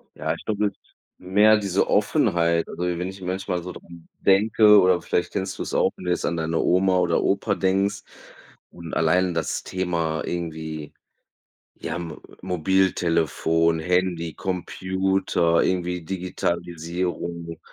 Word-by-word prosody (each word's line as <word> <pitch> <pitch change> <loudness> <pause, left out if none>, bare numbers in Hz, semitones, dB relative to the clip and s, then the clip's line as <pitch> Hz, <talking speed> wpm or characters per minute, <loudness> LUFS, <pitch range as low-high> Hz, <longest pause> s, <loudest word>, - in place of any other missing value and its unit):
Ja, - - -2
ich - - -13
glaube, 105 -1 0
es - - -3
ist - - -34 0.2
mehr 105 +4 +4
diese 100 -2 0
Offenheit. 85 - +2
Also 90 - -5
wenn 90 0 -1
ich 95 0 -10
manchmal 90 -1 -3
so 90 - -6
dran 85 -1 -13
denke 105 +1 +5
oder 90 -1 +3
vielleicht 90 - -1
kennst 95 -1 -3
du - - -3
es - - -6
auch, - - +2
wenn 90 - -11
du 90 - 0
jetzt - - -1
an 85 - -1
deine 80 0 -1
Oma 95 0 +3
oder - - +1
Opa - - +1
denkst 95 +1 0 0.7
und 85 -2 -10
allein 90 +2 +2
das 80 -1 -2
Thema 85 -4 -2
irgendwie, 80 -3 -5 0.8
ja, 85 +2 -5
Mo 80 -3 -7 0.2
Mobiltelefon, 85 -2 +1
Handy, 90 -1 0
Computer, 95 -2 0
irgendwie 90 -1 -1
Digitalisierung, 85 -1 -3
90 Hz, 140 wpm, -24 LUFS, 85-95 Hz, 0.8 s, denke